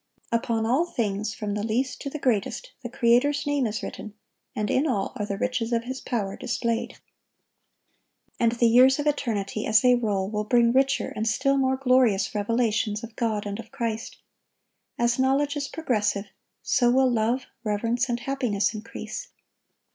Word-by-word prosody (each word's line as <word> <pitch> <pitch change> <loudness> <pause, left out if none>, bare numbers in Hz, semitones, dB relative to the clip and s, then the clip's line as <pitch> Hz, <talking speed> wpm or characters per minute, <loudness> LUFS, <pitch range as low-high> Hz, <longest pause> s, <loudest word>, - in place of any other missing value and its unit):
Upon 230 -1 0
all 260 +9 +2
things, 210 - -2
from 210 -2 -3
the 210 - -2
least 245 +4 -1
to 280 - -4
the 305 - -5
greatest, 260 - -1
the 240 - -6
Creator's 270 +3 +2
name 285 -4 +1
is 215 0 -4
written, 215 -1 -7 0.4
and 210 -1 -1
in 280 +4 +2
all 205 -8 -1
are 205 - -3
the 200 - -3
riches 250 0 -1
of 230 -1 +1
His 260 +1 -6
power 205 -6 -2
displayed. 235 -2 -2 1.4
And 230 -1 +3
the 235 0 +2
years 255 +3 +6
of 290 - -2
eternity, 220 -8 -1
as 220 0 +5
they 250 -1 +5
roll, 205 -6 0
will 210 +1 -2
bring 235 +2 +3
richer 270 +1 +2
and 220 +1 -2
still 275 +5 +2
more 265 -1 +2
glorious 250 -7 +3
revelations 215 0 0
of 230 -1 -9
God 220 -3 -1
and 205 +1 -4
of 225 -1 -10
Christ. 230 -4 -4 0.8
As 240 +1 +1
knowledge 275 +3 +2
is 285 -1 -2
progressive, 210 -10 -1 0.4
so 240 -2 +3
will 260 +2 +4
love, 235 +3 0 0.2
reverence, 230 +4 0
and 240 0 -1
happiness 240 -7 0
increase. 230 - -7
235 Hz, 170 wpm, -25 LUFS, 215-260 Hz, 1.4 s, years